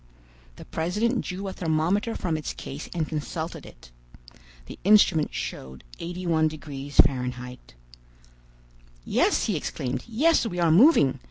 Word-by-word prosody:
The -, -, -12 dB
president 210 Hz, +10 st, -1 dB
drew 190 Hz, +2 st, -5 dB
a 190 Hz, -, -5 dB
thermometer 175 Hz, +7 st, 0 dB
from 170 Hz, -3 st, -2 dB
its 155 Hz, -, -4 dB
case 140 Hz, +3 st, -8 dB
and 165 Hz, -3 st, -2 dB
consulted 160 Hz, +1 st, -5 dB
it. -, -, -16 dB, 0.7 s
The -, -, -11 dB
instrument 190 Hz, -6 st, +4 dB
showed 65 Hz, 0 st, -6 dB, 0.2 s
81° 155 Hz, -5 st, -2 dB
Fahr. 125 Hz, -2 st, +2 dB, 1.5 s
"Yes," -, -, +2 dB
he -, -, 0 dB
exclaimed, 130 Hz, 0 st, -3 dB
"yes, 295 Hz, +9 st, +3 dB
we 180 Hz, -, -5 dB
are 170 Hz, -2 st, +3 dB
moving! 165 Hz, -, +5 dB
160 Hz, 120 wpm, -25 LUFS, 140-185 Hz, 1.5 s, moving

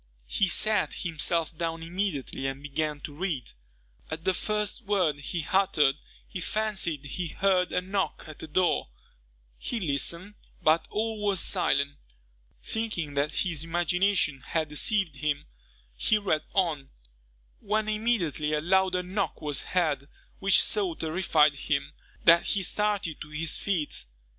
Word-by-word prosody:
He 190 Hz, -, +1 dB
sat 215 Hz, +3 st, +3 dB
himself 165 Hz, 0 st, +1 dB
down 165 Hz, 0 st, -3 dB
immediately 165 Hz, -7 st, -2 dB
and 135 Hz, +1 st, -5 dB
began 150 Hz, 0 st, -2 dB
to 145 Hz, -, -7 dB
read. 155 Hz, -5 st, -3 dB, 0.6 s
At 160 Hz, +1 st, -5 dB
the 190 Hz, -, +3 dB
first 210 Hz, +4 st, -1 dB
word 185 Hz, -8 st, +2 dB
he 160 Hz, +3 st, -4 dB
uttered, 160 Hz, -8 st, +4 dB, 0.3 s
he 185 Hz, -, -6 dB
fancied 190 Hz, -9 st, -1 dB
he 170 Hz, +5 st, -3 dB
heard 185 Hz, +2 st, +1 dB
a -, -, +1 dB
knock 195 Hz, +1 st, -2 dB
at 155 Hz, -1 st, -10 dB
the -, -, -6 dB
door. 175 Hz, +3 st, +1 dB, 0.7 s
He 240 Hz, -, -3 dB
listened, 170 Hz, +4 st, -1 dB, 0.3 s
but 160 Hz, +1 st, +3 dB
all 220 Hz, 0 st, -2 dB
was 200 Hz, -3 st, +2 dB
silent. 140 Hz, -3 st, +1 dB, 0.7 s
Thinking 215 Hz, -10 st, -3 dB
that 140 Hz, +2 st, 0 dB
his 165 Hz, -4 st, 0 dB
imagination 175 Hz, -1 st, +1 dB
had 155 Hz, +5 st, -2 dB
deceived 165 Hz, 0 st, +3 dB
him, 150 Hz, 0 st, -1 dB, 0.5 s
he 215 Hz, -, +2 dB
read 185 Hz, -7 st, 0 dB
on, 160 Hz, -8 st, 0 dB, 0.7 s
when 215 Hz, +1 st, 0 dB
immediately 210 Hz, -, 0 dB
a 150 Hz, -, +2 dB
louder 185 Hz, +2 st, +2 dB
knock 195 Hz, +3 st, -2 dB
was 145 Hz, -3 st, -1 dB
heard, 155 Hz, -6 st, 0 dB, 0.3 s
which 195 Hz, -2 st, +5 dB
so 195 Hz, -6 st, +1 dB
terrified 160 Hz, -3 st, +3 dB
him, 140 Hz, -, -2 dB, 0.3 s
that 170 Hz, +1 st, +7 dB
he 195 Hz, -, +1 dB
started 205 Hz, -6 st, 0 dB
to 150 Hz, -, -7 dB
his 155 Hz, +1 st, 0 dB
feet. 170 Hz, -, -2 dB
170 Hz, 140 wpm, -28 LUFS, 150-195 Hz, 0.7 s, that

